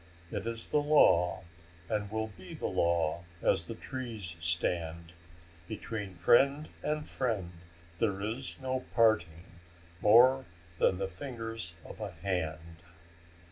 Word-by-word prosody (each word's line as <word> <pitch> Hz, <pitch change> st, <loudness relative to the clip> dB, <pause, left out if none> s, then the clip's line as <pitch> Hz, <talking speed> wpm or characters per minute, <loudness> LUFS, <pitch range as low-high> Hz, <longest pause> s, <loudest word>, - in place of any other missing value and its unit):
It 100 Hz, -, -3 dB
is 115 Hz, -1 st, -3 dB
the 150 Hz, -, +4 dB
law, 95 Hz, -, +4 dB, 0.4 s
And 105 Hz, 0 st, -1 dB
will 110 Hz, +1 st, -2 dB
be 95 Hz, -2 st, -11 dB
the -, -, -5 dB
law 85 Hz, 0 st, +1 dB, 0.2 s
as -, -, +2 dB
the -, -, -5 dB
trees 115 Hz, -9 st, -5 dB
stand. 85 Hz, 0 st, 0 dB, 0.5 s
Between 105 Hz, -3 st, -5 dB
friend 140 Hz, -, +4 dB
and 150 Hz, 0 st, -2 dB
friend 110 Hz, -9 st, -2 dB, 0.5 s
there 100 Hz, -4 st, +1 dB
is 115 Hz, +6 st, -4 dB
no 130 Hz, -1 st, -1 dB, 0.2 s
parting 90 Hz, -8 st, +3 dB, 0.6 s
More 125 Hz, +5 st, +6 dB, 0.3 s
than 95 Hz, -, +3 dB
the 95 Hz, 0 st, -1 dB
fingers 115 Hz, -3 st, -6 dB
of -, -, -10 dB
a 105 Hz, -2 st, -3 dB
hand." 80 Hz, -2 st, -3 dB
105 Hz, 125 wpm, -31 LUFS, 85-115 Hz, 0.6 s, More